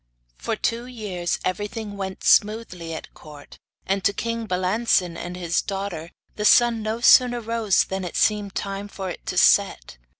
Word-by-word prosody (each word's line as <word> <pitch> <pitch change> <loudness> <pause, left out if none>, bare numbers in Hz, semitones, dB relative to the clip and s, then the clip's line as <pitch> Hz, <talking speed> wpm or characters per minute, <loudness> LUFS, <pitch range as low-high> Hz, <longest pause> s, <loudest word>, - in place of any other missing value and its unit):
For - - -3
two 235 +1 -2
years 200 -8 -3
everything 205 +2 -4
went 190 -1 -6
smoothly 205 -6 +2
at - - -9
court, 150 -2 -14 0.3
and 195 0 -1
to 200 - +2
king 230 +1 -3
Balancin 185 -1 +1
and 175 +1 -6
his 170 -1 0
daughter 195 -5 -5 0.3
the 210 - -3
sun 235 +1 +5
no 220 +2 -3
sooner 245 0 +6
rose 225 -3 +1
than 190 0 -5
it 175 - -6
seemed 205 -2 +1
time 200 0 -4
for 190 -2 -6
it - - -10
to 180 - -3
set. 190 - +3
200 Hz, 165 wpm, -23 LUFS, 180-225 Hz, 0.3 s, sooner